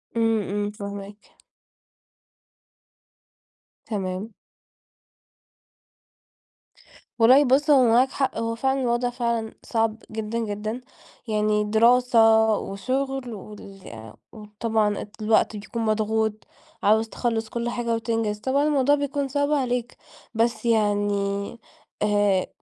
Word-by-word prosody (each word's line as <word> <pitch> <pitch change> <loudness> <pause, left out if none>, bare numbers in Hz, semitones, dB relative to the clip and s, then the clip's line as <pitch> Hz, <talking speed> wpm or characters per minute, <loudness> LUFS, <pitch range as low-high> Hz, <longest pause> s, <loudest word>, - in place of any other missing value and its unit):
امم، 225 -1 +2
امم، 205 +1 -2
فاهماك. 200 0 -9 2.5
تمام. 195 -1 -4 2.9
والله 255 +5 +7
بُص 275 +4 +2
هو 275 -3 +6
معاك 250 +3 +4
حق 265 -4 -1
هو 230 0 -2
فعلًا 265 +3 0
الوضع 245 0 0
فعلًا 235 -2 -2
صعب 225 -1 -1
جدًا 220 +1 -3
جدًا، 215 +2 -4 0.5
يعني 210 -1 +1
دراسة 235 +3 +3 0.4
وشغل 255 +5 -3
وال 195 - -11 0.2
وطبعًا 215 -1 -2 0.2
الوقت 215 0 +2
بيكون 210 +3 -5
مضغوط، 220 0 0 0.5
عاوز 220 +2 +3
تخلص 225 -2 -2
كل 235 +1 -3
حاجة 235 -1 -1
وتنجز، 225 -2 -2
طبعًا 270 +5 +1
الموضوع 290 -1 +3
بيكون 285 0 -2
صعب 285 +2 -1
عليك. 245 -4 -1 0.4
بس 230 +1 0
يعني 205 -2 0 0.5
آآ 205 -3 +2
225 Hz, 100 wpm, -24 LUFS, 210-245 Hz, 2.9 s, والله